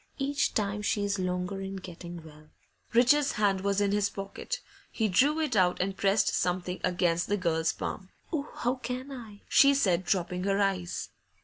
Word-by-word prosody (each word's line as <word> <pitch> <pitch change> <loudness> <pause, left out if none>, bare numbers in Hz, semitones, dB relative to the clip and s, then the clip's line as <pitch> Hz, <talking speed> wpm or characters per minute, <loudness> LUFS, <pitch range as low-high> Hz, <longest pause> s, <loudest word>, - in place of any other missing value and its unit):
Each 285 +1 0
time 205 -1 0
she's 205 -1 0
longer 180 +1 -2
in 195 0 -5
getting 175 -2 -8
well.' 155 -1 -15 0.4
Richard's 260 +5 +4
hand 200 -3 +1
was 200 0 +1
in 200 -1 +2
his 205 -1 +2
pocket; 195 0 -5 0.3
he 220 - 0
drew 280 - +3
it 305 -7 0
out 180 -2 +3
and 190 +1 -1
pressed 195 +2 +2
something 180 0 -1
against 175 -2 +1
the 205 - +1
girl's 165 -3 +1
palm. 190 -2 -5 0.2
'Oh, 295 -2 -2
how 245 +1 -1
can 255 +2 -5
I?' 225 -6 -10
she 280 0 +6
said, 185 -9 +2
dropping 180 0 -1
her 200 0 +1
eyes. 190 -3 -1
195 Hz, 175 wpm, -29 LUFS, 180-220 Hz, 0.4 s, she